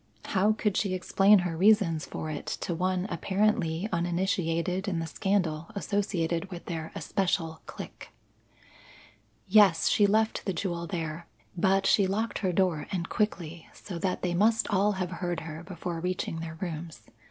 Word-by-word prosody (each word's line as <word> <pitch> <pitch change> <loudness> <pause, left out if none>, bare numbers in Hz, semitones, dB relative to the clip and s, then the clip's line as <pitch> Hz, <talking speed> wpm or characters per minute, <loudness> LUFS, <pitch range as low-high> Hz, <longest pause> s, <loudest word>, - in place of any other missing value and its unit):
How 205 +2 +2
could 210 -2 0
she 195 -3 0
explain 195 +3 +5
her 170 -2 -2
reasons 185 -4 +3
for 155 - -5
it 145 - -6
to 175 - -2
one 185 +2 0
apparently 190 -1 +1
uninitiated 175 +1 0
in 185 -4 0
the 165 - -2
scandal 165 -2 -1
associated 190 -4 -1
with 175 -2 -8
their 160 -2 -5
especial 170 -4 -1
clique. - - -9 1.4
Yes, 190 -5 +5
she 205 - +4
left 220 +2 +1
the 190 - 0
jewel 170 -1 -3
there; 165 0 -4 0.3
but 195 +2 +2
she 195 0 +4
locked 220 +4 -1
her 190 -3 0
door 175 -5 +1
and 180 -2 -2
quickly, 170 -6 -2
so 180 -4 -7
that 185 +1 -1
they 180 -1 0
must 220 +5 +3
all 205 +1 +3
have 185 -2 -3
heard 175 -2 -3
her 160 0 -7
before 175 -1 -5
reaching 180 -2 -2
their 160 -1 -6
rooms. 165 -2 -6
180 Hz, 155 wpm, -28 LUFS, 165-195 Hz, 1.4 s, explain